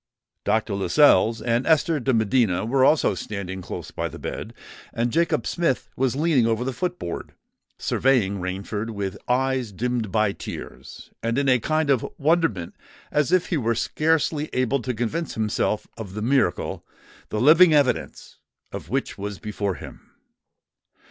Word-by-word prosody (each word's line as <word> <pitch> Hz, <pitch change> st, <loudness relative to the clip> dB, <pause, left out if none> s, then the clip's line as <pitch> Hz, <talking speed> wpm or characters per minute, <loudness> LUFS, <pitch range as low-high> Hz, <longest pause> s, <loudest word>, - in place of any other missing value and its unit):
Dr. 110 Hz, -1 st, +1 dB
Lascelles 115 Hz, +2 st, +4 dB
and 120 Hz, +1 st, 0 dB
Esther 160 Hz, 0 st, +3 dB
de 130 Hz, +1 st, 0 dB
Medina 110 Hz, -4 st, +2 dB
were 130 Hz, +3 st, +2 dB
also 145 Hz, -5 st, +4 dB
standing 95 Hz, -1 st, -5 dB
close -, -, -7 dB
by -, -, -3 dB
the -, -, -9 dB
bed; -, -, -6 dB, 0.4 s
and 115 Hz, +1 st, -1 dB
Jacob 170 Hz, +4 st, +1 dB
Smith 170 Hz, -7 st, -1 dB
was 130 Hz, -1 st, 0 dB
leaning 145 Hz, -6 st, +3 dB
over 115 Hz, +1 st, 0 dB
the 130 Hz, +1 st, -2 dB
foot 180 Hz, +8 st, -2 dB
board, 85 Hz, -, -6 dB, 0.4 s
surveying 110 Hz, -7 st, +1 dB
Rainford 100 Hz, +4 st, -4 dB
with 100 Hz, -3 st, -4 dB
eyes 130 Hz, -2 st, +1 dB
dimmed 115 Hz, 0 st, -2 dB
by 110 Hz, 0 st, +2 dB
tears, -, -, -9 dB
and 115 Hz, +2 st, -1 dB
in 140 Hz, 0 st, +1 dB
a 130 Hz, -1 st, +4 dB
kind 155 Hz, +3 st, +1 dB
of 130 Hz, -4 st, +2 dB
wonderment 145 Hz, -, +1 dB, 0.4 s
as 150 Hz, +1 st, +1 dB
if 185 Hz, -1 st, +2 dB
he 170 Hz, -, +1 dB
were 115 Hz, -3 st, 0 dB
scarcely 155 Hz, +3 st, 0 dB
able 130 Hz, +1 st, +1 dB
to 125 Hz, 0 st, -3 dB
convince 125 Hz, +9 st, -2 dB
himself 110 Hz, -1 st, -1 dB
of 100 Hz, -4 st, -8 dB
the 105 Hz, -, -3 dB
miracle 130 Hz, -7 st, 0 dB, 0.5 s
the 105 Hz, -, -2 dB
living 160 Hz, +7 st, +7 dB
evidence 145 Hz, -4 st, 0 dB, 0.3 s
of -, -, -7 dB
which -, -, -2 dB
was 100 Hz, 0 st, -4 dB
before 100 Hz, -2 st, -3 dB
him. 70 Hz, -, -12 dB
120 Hz, 155 wpm, -24 LUFS, 105-145 Hz, 0.5 s, living